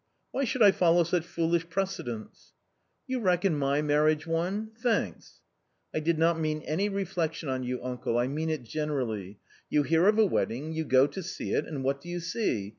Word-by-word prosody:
Why 275 - 0
should 250 -1 +2
I 200 - +9
follow 175 -2 +4
such 170 0 0
foolish 170 0 -1
precedents? 165 - -4 0.2
" - - -47
" - - -48
You 255 0 -1
reckon 180 -4 +2
my 140 +1 +1
marriage 150 +1 +2
one? 180 +7 -1
Thanks! 235 -2 -1 0.2
" - - -48
" - - -47
I - - 0
did 160 +1 +1
not 165 +1 +3
mean 155 -1 -1
any 190 +7 0
reflection 170 -6 -2
on 130 -1 -1
you, 125 0 -3
uncle, 125 -2 -2
I 120 - +2
mean 155 +5 -2
it 155 -5 -2
generally. 115 -8 -3 0.3
You 150 - +3
hear 165 +6 +3
of 215 +1 +4
a 220 - +6
wedding; 155 - -1
you 160 0 -2
go 130 -1 +5
to 190 +6 -5
see 190 +1 -4
it - - 0
and 140 -4 -4
what 140 +1 0
do 175 - -10
you 175 0 -3
see? 165 - -1
160 Hz, 210 wpm, -28 LUFS, 140-180 Hz, 0.3 s, I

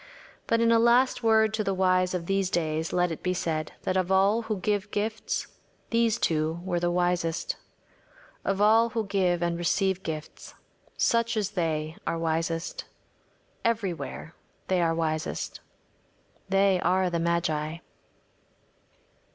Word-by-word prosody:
But 230 0 +2
in 230 0 +4
a 230 - +5
last 240 +3 +4
word 220 -1 +4
to 220 0 0
the 195 -1 -1
wise 185 -1 +2
of 170 -2 -3
these 195 0 0
days 160 -2 -1
let 180 -1 +1
it 160 - -5
be 180 0 -1
said 155 -3 -2
that 185 - -1
of 185 0 0
all 195 +4 +4
who 220 -2 -3
give 205 +2 -1
gifts 215 +2 -2 0.5
these 230 -1 +2
two 160 +1 0
were 180 -2 -1
the 175 0 0
wisest. 175 -1 0 0.9
Of 195 0 -1
all 220 +3 +5
who 225 -1 -2
give 185 -3 +1
and 170 0 -1
receive 190 +2 +1
gifts, 155 -3 -7 0.4
such 230 -1 +2
as 205 -2 -1
they 160 -4 -2
are 165 - 0
wisest. 165 - -2 0.8
Everywhere 195 -7 -2 0.4
they 185 -1 +2
are 165 -1 +2
wisest. 155 0 -2 0.9
They 195 -1 +3
are 185 +1 +2
the 170 - 0
magi. 165 -2 0
185 Hz, 145 wpm, -27 LUFS, 165-210 Hz, 0.9 s, a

